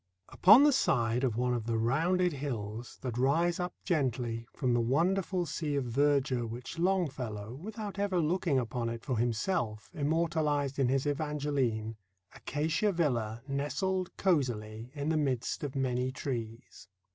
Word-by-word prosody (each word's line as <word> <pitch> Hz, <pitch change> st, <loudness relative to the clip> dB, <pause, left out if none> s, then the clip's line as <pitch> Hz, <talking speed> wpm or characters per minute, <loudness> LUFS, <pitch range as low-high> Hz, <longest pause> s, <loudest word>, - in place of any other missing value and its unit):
* 95 Hz, 0 st, -29 dB
Upon 215 Hz, +9 st, +7 dB
the 295 Hz, -, +6 dB
side 120 Hz, -, +2 dB
of 120 Hz, -4 st, 0 dB
one 125 Hz, 0 st, +1 dB
of 115 Hz, -2 st, -3 dB
the 115 Hz, -1 st, 0 dB
rounded 165 Hz, +10 st, +2 dB
hills 120 Hz, -5 st, -5 dB
that 125 Hz, -2 st, -3 dB
rise 165 Hz, +7 st, +2 dB
up 180 Hz, 0 st, -3 dB
gently 120 Hz, -7 st, -1 dB
from 130 Hz, -4 st, 0 dB
the 120 Hz, -, +3 dB
wonderful 175 Hz, +8 st, +1 dB
sea 155 Hz, -2 st, -2 dB
of 140 Hz, -2 st, 0 dB
verdure 130 Hz, -1 st, +1 dB
which 125 Hz, +7 st, -7 dB
Longfellow, 135 Hz, -, -1 dB
without 205 Hz, -, -6 dB
ever 200 Hz, -3 st, +1 dB
looking 165 Hz, -2 st, +1 dB
upon 120 Hz, -1 st, -1 dB
it 115 Hz, 0 st, -6 dB
for 125 Hz, -4 st, -1 dB
himself, 115 Hz, -, -1 dB
immortalized 150 Hz, -2 st, 0 dB
in 135 Hz, -, +3 dB
his 135 Hz, +1 st, +1 dB
"Evangeline," 145 Hz, -7 st, -1 dB, 0.4 s
Acacia 160 Hz, +8 st, 0 dB
Villa 120 Hz, -, -1 dB
nestled 180 Hz, +7 st, -2 dB
cozily 120 Hz, -, 0 dB
in 145 Hz, +1 st, -2 dB
the 160 Hz, -, +2 dB
midst 135 Hz, -4 st, -1 dB
of 140 Hz, -1 st, -4 dB
many 130 Hz, -1 st, 0 dB
trees. 115 Hz, -7 st, -6 dB
135 Hz, 150 wpm, -31 LUFS, 120-165 Hz, 0.4 s, Upon